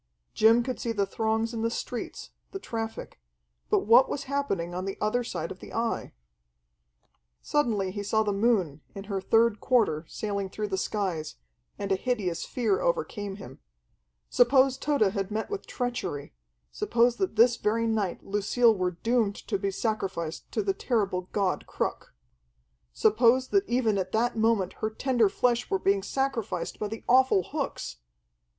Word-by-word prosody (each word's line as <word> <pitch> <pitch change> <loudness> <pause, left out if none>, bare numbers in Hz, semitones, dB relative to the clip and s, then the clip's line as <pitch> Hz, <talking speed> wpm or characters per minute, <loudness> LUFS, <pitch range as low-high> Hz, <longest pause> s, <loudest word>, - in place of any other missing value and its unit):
Jim 225 +2 +5
could 255 +1 -4
see 235 - -2
the 205 -3 +1
throngs 220 +3 -1
in 225 - -3
the 230 - +1
streets, 240 +1 -5 0.2
the - - -3
traffic. 225 - -6 0.5
But - - +3
what 235 +5 +6
was 280 - -3
happening 230 -12 -2
in 180 +1 -3
the 195 - -4
other 230 +4 +1
side 170 -8 -4
of 185 - -8
the - - -11
Eye? 230 0 -1 1.3
Suddenly 215 -10 0
he 205 +1 -4
saw 220 +2 +1
the 205 -1 0
moon 195 -9 +1
in 195 - -6
her 195 -1 -3
third 225 +2 +3
quarter 220 -12 +2
sailing 200 -2 -3
through 210 +2 -4
the 190 - -1
skies, 185 -7 -2 0.4
and 200 -1 -4
a - - +4
hideous 195 -5 -2
fear 280 - 0
overcame 455 - -1
him. 135 -10 -11 0.7
Suppose 260 +2 +4
Tode 270 -10 +1
had 195 -2 -2
met 220 - -3
with 410 - -5
treachery; 240 - -4 0.4
suppose 235 - +2
that 380 - -1
this 235 +2 +5
very 225 +2 0
night 215 -5 -1
Lucille 220 +3 +3
were 180 -2 -2
doomed 225 -4 +2
to 200 -4 -3
be 200 0 -1
sacrificed 190 -6 -3
to 215 - -1
the 195 -1 +1
terrible 195 -5 -1
god 195 -3 -1
Cruk! - - -4 0.8
Suppose 235 - +3
that 395 0 +2
even 230 -5 +2
at 185 0 -4
that 240 +2 +1
moment 220 -4 +1
her 215 - 0
tender 235 -1 +2
flesh 240 +3 +1
were 195 - +2
being 195 +1 +2
sacrificed 230 -6 -2
by 210 - -2
the 220 +2 -7
awful 255 -6 +5
hooks! - - -4
220 Hz, 165 wpm, -27 LUFS, 195-240 Hz, 1.3 s, what